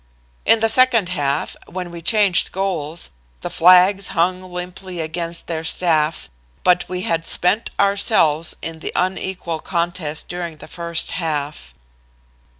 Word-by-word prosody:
"In 225 - +5
the 225 - +4
second 230 -5 +4
half, 145 -6 -1
when 180 -1 -6
we 170 0 -8
changed 200 0 +3
goals, 175 -4 -1 0.3
the - - -5
flags 185 +3 +5
hung 180 +2 +2
limply 180 0 -7
against 165 +1 -3
their 160 -1 -4
staffs, 160 - +2 0.3
but 180 -1 +3
we 180 0 -3
had 165 -7 -1
spent 180 +6 0
ourselves 195 -6 +2
in 165 -1 -5
the - - -5
unequal 185 -2 -2
contest 170 -3 -2
during 175 -2 -5
the 155 - -12
first 170 -1 -2
half." 150 - -4
175 Hz, 135 wpm, -20 LUFS, 165-185 Hz, 0.3 s, In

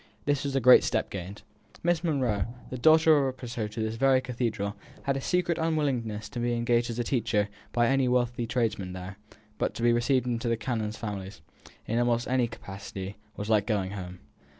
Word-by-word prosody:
This 145 -1 +1
was 140 -1 -2
a - - +4
great 125 0 +8
step 110 -2 -1
gained. 95 +2 -7 0.4
Miss 175 0 +2
Monro, 125 - 0 0.2
the 130 - -3
daughter 160 +2 +6
of - - 0
a 130 - -19
precentor 115 -4 -4
to 115 - -3
this 110 +1 -2
very 135 +1 +4
cathedral, 115 -5 -2 0.3
had 140 - 0
a 135 - -2
secret 175 +1 0
unwillingness 135 -10 -1
to - - -5
being 120 0 0
engaged 120 0 +1
as 115 - -4
a 120 - 0
teacher 115 -4 0 0.2
by 120 0 +3
any 135 +1 +3
wealthy 120 -1 +1
tradesman 110 -7 -1
there; 95 +2 -8 0.4
but - - -1
to 115 - -4
be 120 0 +5
received 125 +1 +2
into 120 -1 -1
the 115 - +1
canons' 110 -2 -2
families, 100 -5 -6 0.4
in 115 +2 0
almost 120 0 +1
any 125 -1 +2
capacity, 100 -3 -8 0.2
was 105 - -4
like 105 -2 +2
going 100 -4 0
home. 90 -2 -6
120 Hz, 195 wpm, -28 LUFS, 105-130 Hz, 0.4 s, great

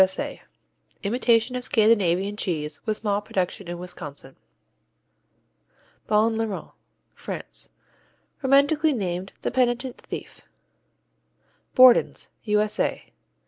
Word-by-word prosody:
S.A._ 190 0 -2 0.6
Imitation 235 +2 +2
of 250 - -3
Scandinavian 205 -4 +2
cheese, 155 -7 -3
with 215 -1 +1
small 205 -2 -1
production 190 -2 -3
in 175 0 -5
Wisconsin. 150 -6 -8 1.7
Bon 220 +1 +3
Larron 225 -3 -3 0.4
France - - -8 0.7
Romantically 285 +3 +3
named 185 -4 -3
"the - - -1
penitent 250 0 0
thief." - - -8 1.3
Borden's 255 -1 +5 0.2
_U.S.A. 210 0 0
210 Hz, 90 wpm, -24 LUFS, 185-245 Hz, 1.7 s, Borden's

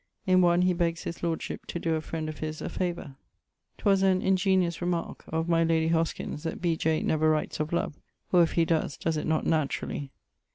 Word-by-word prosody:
In 185 -1 +5
one 175 0 +4
he 180 0 +3
begges 170 -1 -1
his 170 - -6
lordship 165 -1 -3
to - - -4
doe 165 -1 -1
a 160 - 0
friend 160 0 -4
of 155 -1 -6
his 155 0 -4
a - - -4
favour. 175 -7 -4 0.6
'Twas 195 -2 +3
an 190 -1 +4
ingeniose 185 -2 +2
remarque 175 -1 -2
of 160 +1 -2
my 165 -1 +3
lady 160 -1 +2
Hoskins, 165 -2 -1
that 165 0 -4
B. 170 -2 +1
J. 160 0 0
never 155 0 +2
writes 155 0 0
of 155 0 -2
love, 170 -3 -2 0.3
or 180 - +6
if 165 - +2
he 165 - +3
does, 160 -3 0
does 165 - -1
it 150 - -2
not 160 0 +1
naturally. 145 -2 -1
165 Hz, 210 wpm, -28 LUFS, 155-175 Hz, 0.6 s, or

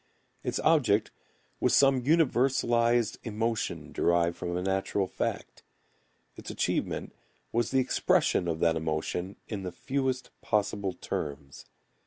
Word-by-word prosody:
Its - - -1
object 115 -10 +3 0.5
was - - +3
some 135 -2 +5
universalized 120 -5 +2
emotion 115 0 -2
derived 85 0 +2
from 90 -1 -3
a 90 - -2
natural 95 +1 0
fact. - - -4 0.7
Its - - -9
achievement - - -2 0.4
was 120 +1 +1
the 135 - +1
expression 125 -7 +2
of 80 -1 -1
that 85 -1 +3
emotion 80 +4 -2
in 105 -3 -4
the 90 -1 -4
fewest 130 +6 -2
possible 100 -2 0
terms. 70 -4 -5
105 Hz, 120 wpm, -29 LUFS, 90-125 Hz, 0.7 s, some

